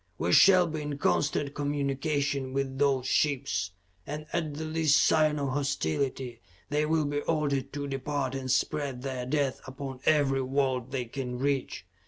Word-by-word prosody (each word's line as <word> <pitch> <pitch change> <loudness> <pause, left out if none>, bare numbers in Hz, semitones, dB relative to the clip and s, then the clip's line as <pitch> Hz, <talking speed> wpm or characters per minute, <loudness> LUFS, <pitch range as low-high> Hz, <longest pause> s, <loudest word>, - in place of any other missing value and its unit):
We 85 +2 0
shall 185 -2 +7
be 155 -2 -4
in 145 -1 -4
constant 145 0 +1
communication 140 -1 -1
with 135 -1 -2
those 135 -3 +2
ships, 130 -10 +1 0.4
and 150 +1 -5
at 160 -4 -1
the 160 +2 -4
least 155 -2 +3
sign 155 -1 +3
of 140 -2 -1
hostility, 130 - -2 0.3
they 150 +1 +1
will 160 -1 +2
be 145 0 -1
ordered 140 -4 -1
to 145 0 -3
depart 135 -1 -2
and 135 -1 -4
spread 135 -1 0
their 130 -2 -4
death 140 -1 0
upon 135 -1 -6
every 140 -3 +3
world 130 -2 0
they 130 -2 -2
can 125 0 -5
reach. 135 0 -1
140 Hz, 160 wpm, -29 LUFS, 130-150 Hz, 0.4 s, shall